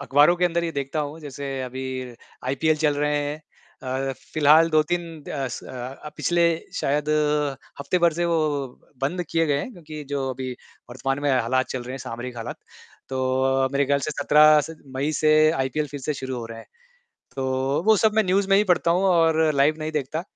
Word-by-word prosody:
अखबारों 145 +4 +4
के 180 - +1
अंदर 170 -1 +1
ये 165 - -3
देखता 140 +2 -2
हूँ 150 +1 -5
जैसे 140 -1 -7
अभी 130 +1 -5 0.6
आईपीएल 155 +4 +1
चल 150 -1 +1
रहे 150 0 0
हैं। 145 0 -2 0.7
अ, - - -3 0.2
फिलहाल 155 +2 +5
2-3 155 +3 +1 0.2
द 135 -3 -2
स - - -7
अ, 130 +4 -8
पिछले 175 0 +2 0.4
शायद 150 +2 0 0.7
हफ्ते 140 +6 0
भर 170 -1 +4
से 175 +2 -1
वो 170 -1 +1 0.6
बंद 175 +7 -1
किए 165 -1 +2
गए 145 -1 +1
हैं 250 - -5
क्योंकि 155 -5 -9
जो 135 -1 -1
अभी 130 0 -5 0.4
वर्तमान 135 +2 -2
में 145 - +2
हालात 130 +1 +1
चल 130 -2 -3
रहे 125 +1 -7
हैं, 135 - -5
सामरिक 120 +1 -7
हालात। 115 - -6 0.5
तो 130 0 +1
मेरे 140 0 +2
ख़्याल 140 +1 +2
से 155 - -2
17 150 +1 +5
स 160 - -10 0.2
मई 145 +3 0
से 155 0 +5 0.2
आईपीएल 150 0 -1
फिर 145 - -7
से 150 +3 -2
शुरू 130 -1 -5
हो 115 - -5
रहा 115 0 -9
है। - - -12 0.7
तो 135 +3 -1
वो 220 -1 +6
सब 215 +1 +3
मैं 220 -1 +3
न्यूज़ 190 +2 +1
में 195 - +6
ही 210 - +4
पढ़ता 170 -1 +1
हूँ 180 +3 +2
और 165 -3 +3
लाइव 140 +3 +3
नहीं 155 0 -4
देखता 150 +2 -2
145 Hz, 195 wpm, -24 LUFS, 135-160 Hz, 0.7 s, वो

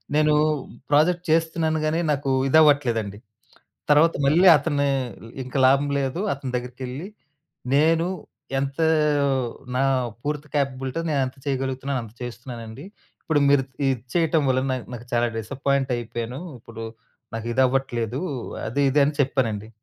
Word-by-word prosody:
నేను 155 0 +4 0.6
ప్రాజెక్ట్ 170 +4 +3
చేస్తున్నాను 160 -1 +1
గానీ, 160 +2 +1
నాకు 140 -1 -1 0.2
ఇదవ్వట్లేదండి. 130 -9 +3 0.7
తర్వాత 155 +3 +5
మళ్ళీ 170 +7 +5
అతనే, 145 -1 0 0.4
ఇ - - -13
ఇంకా 130 +2 -4
లాభం 140 +2 +3
లేదు 135 +6 -2
అని, - - 0
అతని 130 -2 -6
దగ్గరికెళ్లి 125 +6 -6 0.7
నేను, 165 +3 +3 0.5
"ఎంత 135 +1 -3 1.0
నా 135 - +2 0.4
పూర్తి 150 0 -3
క్యాపబిలిటీతో 135 +2 -1
నేనంత 135 -2 -1
చేయగలుగుతున్నానో, 135 0 -2
అంత 110 0 -14
చేస్తున్నానండి. 120 +1 -8 0.4
ఇప్పుడు 155 -3 +1
మీరు 140 -2 +4 0.2
ఇది 130 -2 +1 0.2
చేయటం 165 -2 +2
వలన 130 +1 +1
నా - - 0 0.2
నాకు 120 0 -8
చాలా 120 0 +3
డిసప్పాయింట్ 135 +4 -1
అయిపోయాను. 120 +2 -5 0.2
ఇప్పుడు 115 0 -9 0.5
నాకిదవ్వట్లేదు. 125 +1 0 0.5
అది, 120 +6 -1
ఇది" 145 +2 +3
అని 150 - -1
చెప్పానండి. 115 -6 -1
135 Hz, 125 wpm, -24 LUFS, 125-150 Hz, 1.0 s, తర్వాత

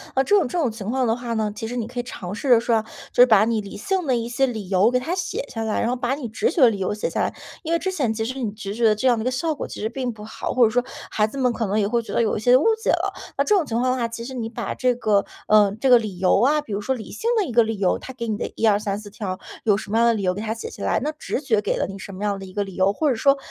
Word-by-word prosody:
那 265 - +3
这 410 - +3
种 360 -9 +3
这 350 - -4
种 270 -9 +1
情 215 -1 -6
况 260 +1 +1
的 225 -1 +2
话 240 -1 -4
呢， 215 -1 0
其 220 +1 -5
实 245 - -5
你 235 -3 -2
可 245 +1 -6
以 - - -1
尝 185 -6 -7
试 255 +6 -4
着 240 -2 +7
说 230 -1 +2
啊， - - +1 0.3
就 - - +4
是 250 - +9
把 215 -2 +5
你 225 -2 0
理 200 0 -9
性 370 - -1
的 255 - +3
一 230 0 -2
些 255 +3 +1
理 220 -6 -5
由 195 +3 +4
给 250 0 +1
它 325 +8 -3
写 350 -5 -3
下 225 -4 -4
来， 220 - -1
然 - - 0
后 - - 0
把 255 +1 -1
你 275 -5 -5
直 425 - 0
觉 340 - -3
的 245 -3 +7
理 200 - -4
由 190 +1 -1
写 210 - -2
下 - - -3
来。 - - 0 0.3
因 330 -1 -5
为 335 - +3
之 380 +2 -2
前 275 -11 0
其 220 0 -2
实 260 +3 -4
你 220 - -1
直 200 -2 -6
觉 235 - -3
的 215 -2 +5
这 260 +5 0
样 240 -3 +3
的 - - -2
一 - - -4
个 - - +2
效 305 +5 -1
果 - - -5
其 - - -8
实 215 - -1
并 250 0 -3
不 210 -2 -11
好， 220 - -5
或 250 - +4
者 220 - +1
说 245 +2 +2 0.3
孩 215 0 +2
子 250 - -9
们 250 -3 +2
可 225 -3 -2
能 205 +3 +1
也 200 - +2
会 235 +2 +1
觉 230 - -9
得 - - 0
有 220 - 0
一 - - -2
些 245 +4 +5
误 265 - 0 0.2
解 - - 0
了。 - - +1 0.2
那 - - +3
这 420 - +3
种 370 - +3
情 230 -5 -3
况 255 +1 +2
的 255 - 0
话， 235 - 0
其 230 0 -7
实 260 - -7
你 230 -3 -4
把 230 -3 -4
这 250 -1 +1
个 210 -4 +2 0.2
呃， 210 -2 +5
这 270 - +1
个 245 -2 +7
理 210 -5 -6
由 190 +3 +3
啊， 300 +4 +3
比 210 - -7
如 205 - -2
说 265 +5 -1
理 220 -5 -9
性 460 - -2
的 415 - +2
一 - - -5
个 235 0 +5
理 220 -1 -3
由， 190 -2 +1
它 - - -8
给 235 -2 -5
你 215 - -1
的 - - -3
1234 210 -1 0
条 190 -3 -5 0.2
有 205 -2 +3
什 210 - -7
么 225 - +2
样 235 - +5
的 230 - +3
理 210 - -3
由 180 - +2
给 205 - -5
它 220 0 -2
写 225 - -7
下 - - -8
来， - - +1
那 300 - -1
直 300 -2 -4
觉 225 -7 +2
给 - - -1
了 - - 0
你 195 +1 -8
什 195 - -8
么 200 - -6
样 200 -1 -1
的 195 - -8
一 185 - -12
个 205 +1 0
理 195 -2 -9
由， 190 +1 +2
或 300 +6 +1
者 255 - +1
说 275 +4 +4
230 Hz, 385 characters per minute, -23 LUFS, 210-255 Hz, 0.3 s, 是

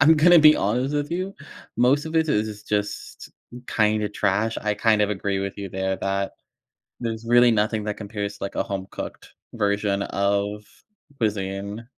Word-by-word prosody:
I'm 155 +3 +7
gonna 175 +3 +7
be 155 0 +8
honest 125 +7 0
with 145 0 -1
you. 185 +3 -2 0.4
Most 135 +4 +3
of 160 - -3
it 160 -1 +2
is 105 -4 -1
just 105 -1 -3 0.4
kinda 105 -1 +1
trash. 105 +2 0
I 105 -1 0
kind 110 0 +2
of 105 - +2
agree 100 -1 -1
with 100 0 -4
you 100 -1 -5
there 95 +1 -2
that 100 0 -1 0.7
there's 115 -1 -4
really 120 +1 +5
nothing 110 0 +1
that 105 -1 -3
compares 105 -1 -5
to, - - -7
like, 100 - -5
a - - +1
home 100 -4 -5
cooked - - -8 0.2
version 100 -2 0
of 100 +1 -1 0.5
cuisine. 100 0 -3
105 Hz, 170 wpm, -24 LUFS, 100-120 Hz, 0.7 s, be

